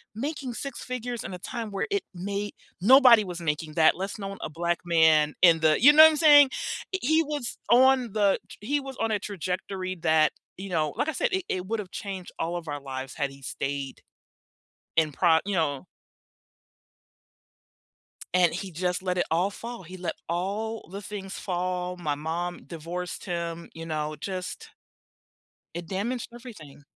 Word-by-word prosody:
making 270 +1 -4
6 275 0 -6
figures 245 -1 -4
in 195 - -6
a 180 - -7
time 225 +1 -5
where 195 - -2
it 400 -1 0
may 200 +3 -4 0.3
nobody 245 0 +8
was 180 -3 -6
making 155 -1 -2
that 160 0 +5
less 195 +4 -4
known 195 -1 -6
a - - -4
black 170 +2 -1
man 160 -3 +4
in 170 -2 +7
the 155 -1 +3
you 290 +5 +9
know 310 +1 +10
what 315 - +10
I'm 315 - -1
saying? 290 -3 +8 0.5
He 315 +4 +3
was 290 -5 -4
on 255 -1 +5
the 205 -2 +3 0.2
he 280 +8 0
was 270 -2 -8
on 225 - 0
a 210 - +1
trajectory 185 -1 -4
that, 160 -2 +3 0.3
you 195 +1 -7
know, 155 -4 0
like - - 0
I - - +1
said, - - 0
it 380 -1 0
it 185 -1 -2
would 225 +2 -1
have 195 -4 -7
changed 190 -3 -6
all 170 +2 -1
of 170 -2 -8
our 145 -1 -4
lives 130 -1 -6
had 140 -3 -1
he 135 0 -14
stayed 135 +1 -4 1.0
in 160 -2 +3
pro 165 +2 +4
you 205 - -1
know. 145 -6 -1 2.5
And 180 -2 +4
he 185 +2 -5
just 180 +2 -1
let 180 -1 -1
it 175 - +2
all 175 +4 +2
fall. 235 +1 -8
He 185 +3 -10
let 175 -2 -3
all 205 +6 -3
the 200 +1 -6
things 200 -1 -7
fall. 180 -1 -2
My 155 -5 -2
mom 170 +4 -4
divorced 175 +2 -6
him, 170 -2 -4
you 165 0 -8
know, 155 -1 -3
just 185 +1 -5 1.1
it 170 0 -5
damaged 225 +7 -3
everything. 210 - -12
185 Hz, 175 wpm, -27 LUFS, 165-225 Hz, 2.5 s, know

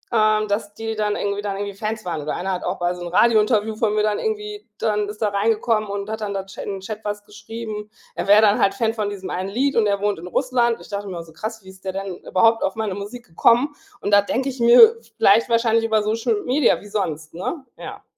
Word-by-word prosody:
ähm, 215 0 +3
dass 205 0 -2
die 225 0 -4
dann 210 -1 0
irgendwie 200 0 -2
dann 200 -1 -3
irgendwie 200 0 -4
Fans 215 +1 -4
waren. 165 -4 -3
Oder 150 - -3
einer 190 +2 -3
hat 180 - -3
auch 180 - -2
bei 175 0 0
so 180 - -10
'n - - -5
Radiointerview 215 +2 +3
von 215 -1 0
mir 210 - +2
dann 210 -1 +1
irgendwie 420 -1 -3
dann 210 -1 0
ist 215 +1 -5
da 210 - +2
reingekommen 215 +1 +1
und 200 0 -4
hat 220 0 -5
dann 200 -1 -3
da 195 - -2
Ch 195 - -14
in 200 - -4
'n - - -7
Chat 215 +2 -7
was 205 0 -4
geschrieben. 215 0 -7 0.2
Er - - -4
wäre 205 +1 +7
dann 205 -1 +4
halt 195 - +3
Fan 225 -3 0
von 210 -3 -2
diesem 195 -2 -6
einen 185 +2 -3
Lied 275 +6 0
und 220 -2 +3
er 200 0 0
wohnt 205 -4 0
in 175 - -8
Russland. 240 +1 +1
Ich - - -14
dachte 205 0 -4
mir, 185 -3 -5
oh, - - -5
so 160 -1 -17
krass, 220 +3 -6
wie 190 - -13
ist 190 0 -15
der 190 -1 -3
denn 195 -2 -5
überhaupt 225 +4 +2
auf 190 - -1
meine 220 -3 -2
Musik 205 +5 -7
gekommen? 240 - +2 0.3
Und 205 - -2
da 205 0 +7
denke 260 +6 -1
ich 260 -1 -7
mir 250 - +8 0.2
vielleicht 215 +4 +4
wahrscheinlich 230 -1 +2
über 220 -1 +2
Social 220 0 0
Media. 260 +1 +3
Wie 205 - -13
sonst, 160 -7 -3
ne? 265 - -5
Ja. - - -9
210 Hz, 255 wpm, -22 LUFS, 200-225 Hz, 0.3 s, mir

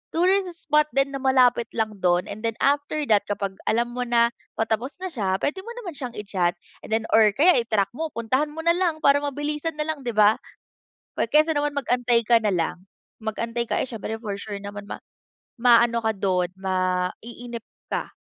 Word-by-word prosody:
tourist 360 0 +1
spot 300 0 +5
din 275 0 +2
na 275 - -4
malapit 255 -3 +3
lang 215 -3 -2
dun 175 0 +2
and 205 - -7
then 225 -1 -1
after 290 +2 +1
that 205 -1 +4
kapag 200 -1 -3
alam 235 +2 +1
mo 250 0 -3
na 235 0 +3 0.2
patapos 225 +4 -1
na 375 - -3
siya. 195 -8 -1
Puwede 295 - -2
mo 435 +5 -8
naman 360 - -5
siyang 255 -6 -6
i-chat, 190 -4 -1 0.3
and - - -15
then 220 - 0
or 215 -2 +5
kaya 340 +5 +5
i-track 215 -4 0
mo, 320 +6 -3
puntahan 255 +6 0
mo 315 +2 -7
na 335 - +4
lang 340 -3 0
para 280 0 +5
mabilisan 295 +2 -3
na 300 - -1
lang, 310 - -7
'di 235 - -2
ba? 210 0 +5 0.8
'Pag - - +1
kaysa 305 +2 +5
naman 290 0 -1
mag-antay 245 -4 +2
ka 235 +1 +5
na 210 -3 0
lang, 175 +2 -2 0.3
mag-antay 230 +2 -3
ka, - - 0
eh, - - -4
siyempre 220 -1 -5
for 205 -3 -4
sure 205 0 -6
naman 205 0 -7
ma - - -8 0.6
maano 235 -1 +5
ka 220 -1 +1
do'n, 185 -2 0
maiinip 190 +6 -3 0.3
ka. - - -2
235 Hz, 195 wpm, -24 LUFS, 210-290 Hz, 0.8 s, spot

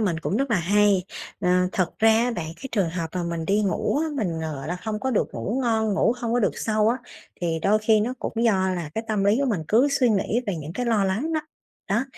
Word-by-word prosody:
mình 180 -7 0
cũng 195 - -1
rất 275 0 -1
là 230 - +3
hay. 200 +1 +3 0.4
Ờ, 180 - 0 0.2
thật 185 -3 +1
ra 225 - +5
á 235 +2 +2
bạn 165 - -3
cái 270 - -8
trường 195 -6 +1
hợp 165 -1 -3
mà 180 - -1
mình 170 -1 -3
đi 205 +5 +2
ngủ 200 +8 0
á, 320 - 0
mình, 175 -9 -2
ờ, 160 -1 -3
gọi 135 +3 -7
là, 175 - -2
hông 215 -1 -3
có 265 - -1
được 225 - +1
ngủ 235 +6 -2
ngon, 220 -3 +1
ngủ 225 - +3
hông 235 -2 -3
có 245 - +2
được 210 - 0
sâu 215 -1 +1
á, 235 - +2 0.4
thì 165 -2 -1
đôi 210 +2 +3
khi 215 0 +3
nó 240 +4 -1
cũng - - -4
do 230 - +5 0.2
là 175 -4 -3
cái 225 - -3
tâm 210 -2 0
lý 205 +3 +4
của 280 - +1
mình 210 -10 0
cứ 245 +6 +4
suy 275 -3 +3
nghĩ 215 +2 +1
về 200 -4 -1
những 155 +1 -7
cái 245 +6 -3
lo 215 -4 +2
lắng 225 +13 -1
đó, 315 - +1 0.5
đó. 215 +6 +1
210 Hz, 270 wpm, -24 LUFS, 180-230 Hz, 0.5 s, ra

